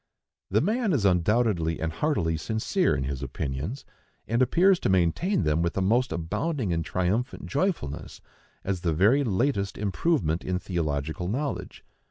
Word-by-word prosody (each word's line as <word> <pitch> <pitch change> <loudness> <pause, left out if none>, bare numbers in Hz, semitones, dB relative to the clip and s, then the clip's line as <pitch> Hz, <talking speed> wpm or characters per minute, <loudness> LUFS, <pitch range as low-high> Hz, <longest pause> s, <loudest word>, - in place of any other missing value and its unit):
The 105 - +3
man 215 - +1
is 120 -9 +1
undoubtedly 90 -2 +2
and 80 0 -2
heartily 90 - 0
sincere 110 - 0
in 65 - -2
his 65 0 -4
opinions, 70 - -4 0.4
and 115 +2 +1
appears 175 +9 +4
to - - 0
maintain 95 - +2
them 75 +1 +1
with 85 +2 -1
a - - +2
most 120 +6 +2
abounding 95 - -2
and 80 0 0
triumphant 95 +10 -1
joyfulness, 140 - -2 0.4
as 95 -3 -2
the 85 -3 0
very 110 - +4
latest 105 -2 0
improvement 100 - 0
in 90 -1 -1
theological 80 -2 -2
knowledge. 135 +8 -4
95 Hz, 150 wpm, -26 LUFS, 80-130 Hz, 0.4 s, appears